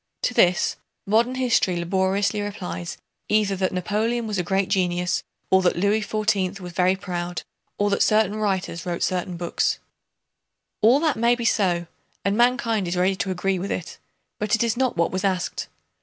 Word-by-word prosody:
To - - +1
this, 180 -5 +3 0.3
modern 230 +5 +2
history 240 -8 +2
laboriously 190 +4 0
replies 195 -4 -5 0.3
either 210 -2 +2
that 185 0 0
Napoleon 215 +6 -1
was 210 -3 -2
a - - 0
great 190 +2 0
genius, 180 -1 0 0.3
or 190 0 +6
that 180 - +2
Louis 200 +4 +2
XIV 205 -2 0
was 180 -2 -8
very 185 +2 +3
proud, 175 -2 -4 0.3
or 205 0 +1
that 200 - +1
certain 215 -1 +3
writers 190 -5 -1
wrote 175 -1 -2
certain 180 -1 -1
books. 175 0 0 1.0
All 235 +6 +6
that 315 -6 +1
may 235 +2 +3
be 240 -1 -4
so 180 -6 +2 0.4
and 200 +1 +2
mankind 235 -4 +2
is 175 +1 -2
ready 185 +2 +2
to 195 - -2
agree 185 0 0
with 195 +3 -4
it, 175 - -5 0.4
but 210 +2 +2
it 220 - +1
is 230 -2 +1
not 255 -5 0
what 170 - +2
was 185 +1 -2
asked. 185 -2 -1
195 Hz, 175 wpm, -24 LUFS, 180-215 Hz, 1.0 s, or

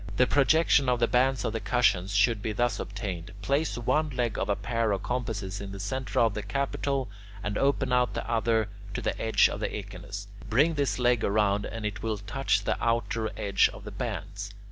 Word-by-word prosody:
The 125 - +6
projection 145 0 +4
of 125 -1 +2
the 120 - +3
bands 130 +1 +2
of - - -1
the 115 - -1
cushions 100 -4 +1
should 105 +1 +3
be 110 - -2
thus 120 0 0
obtained: 95 -4 -5
place 140 +6 0
one 150 +6 +1
leg 120 -5 -1
of - - -2
a 100 - +3
pair 115 +2 -1
of 100 - -3
compasses 110 -6 -3
in 100 -1 -6
the 100 - -7
centre 130 +7 -2
of 115 -3 +3
the 105 - -3
capital 140 +1 -1 0.4
and 105 0 -2
open 135 -1 +1
out 125 0 +2
the - - -3
other 115 -2 +1 0.3
to - - -2
the - - 0
edge 110 -1 +4
of - - -5
the - - -1
echinus; - - -7 0.2
bring 145 +9 +4
this 145 -3 0
leg 125 -2 +3
round 100 0 +2
and 115 -1 -6
it 105 - -3
will 110 -1 -1
touch 105 +1 0
the - - -1
outer 115 -1 0
edge 100 - +3
of - - -11
the - - -7
bands. - - -5
115 Hz, 210 wpm, -28 LUFS, 105-125 Hz, 0.4 s, The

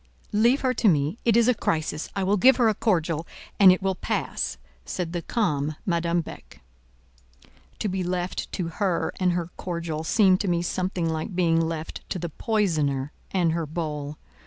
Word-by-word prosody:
"Leave 235 +6 +4
her 255 -1 +1
to 235 - +1
me; 155 - +2
it 230 -1 +4
is 235 0 +4
a 250 - +5
crisis: 155 -7 -2
I 195 - 0
will 195 +2 +2
give 255 +6 +6
her 240 -3 +4
a 220 - +3
cordial, 165 -6 0 0.3
and 195 -2 +9
it 185 +1 0
will 195 0 +1
pass," 180 - -2 0.3
said 170 - -4
the 175 - -2
calm 155 -9 -1
Madame 170 -1 +1
Beck. 155 - -12 1.1
To - - -2
be 190 -1 -2
left 180 0 -3
to 175 -4 -2
her 180 0 -1
and 180 -1 +2
her 175 -1 -3
cordial 170 -3 -4
seemed 190 +1 +4
to 205 - -2
me 170 -1 +1
something 180 -1 -1
like 160 +3 -3
being 165 -2 +3
left 160 -1 -4
to - - -2
the 170 -1 -4
poisoner 155 - 0 0.2
and 175 -4 +1
her 165 -1 -2
bowl. 150 -2 -4
175 Hz, 185 wpm, -25 LUFS, 160-195 Hz, 1.1 s, and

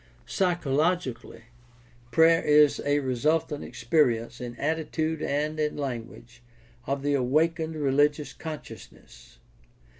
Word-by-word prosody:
Psychologically, 160 - -1 0.7
prayer 165 +6 +5
is 150 -1 +4
a 145 0 +2
resultant 145 +4 0
experi 125 0 +1
ence 120 +1 -11
in 120 -1 -6
attitude 160 +1 -2
and 150 +2 -2
in 150 0 -1
language 120 -3 -6 0.5
of 140 +1 -2
the 145 0 +1
awakened 160 +5 +1
religious 145 +1 +1
consciousness. 155 - -11
145 Hz, 100 wpm, -26 LUFS, 130-160 Hz, 0.7 s, prayer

